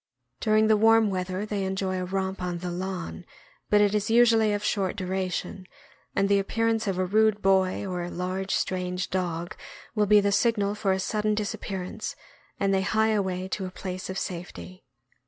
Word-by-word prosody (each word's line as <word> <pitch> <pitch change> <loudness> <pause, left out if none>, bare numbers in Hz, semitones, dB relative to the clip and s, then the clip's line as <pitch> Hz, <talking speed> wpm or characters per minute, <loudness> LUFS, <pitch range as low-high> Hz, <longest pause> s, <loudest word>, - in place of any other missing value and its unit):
During 215 0 +3
the 215 0 +4
warm 225 -1 +5
weather 185 +1 -2
they 205 -2 -2
enjoy 190 -1 -1
a - - -2
romp 190 0 -2
on 180 -1 -2
the 175 +1 -4
lawn, 185 0 -5 0.5
but 210 0 +5
it 205 -1 +3
is 210 0 0
usually 225 -2 +5
of 205 0 -1
short 195 -3 0
duration, 185 0 -3 0.5
and 195 - +2
the 200 0 +4
appear 225 +3 0
ance 225 -1 0
of 190 -2 -1
a 185 - +1
rude 215 +2 +2
boy 190 0 +2
or 180 -2 -3
a 175 - -4
large 185 +2 -3
strange 180 0 -2
dog 175 -2 -2 0.4
will 210 -2 +1
be 210 +1 +7
the 200 0 +1
signal 205 -2 +2
for 210 -2 0
a 190 - +1
sudden 210 +2 0
disappearance, 205 0 -4 0.4
and 195 0 +2
they 190 - +2
hie 220 +3 +2
away 190 -3 -1
to 190 -1 -3
a - - -6
place 185 0 -6
of 190 - -4
safety. 185 +1 -6
195 Hz, 190 wpm, -26 LUFS, 185-210 Hz, 0.5 s, be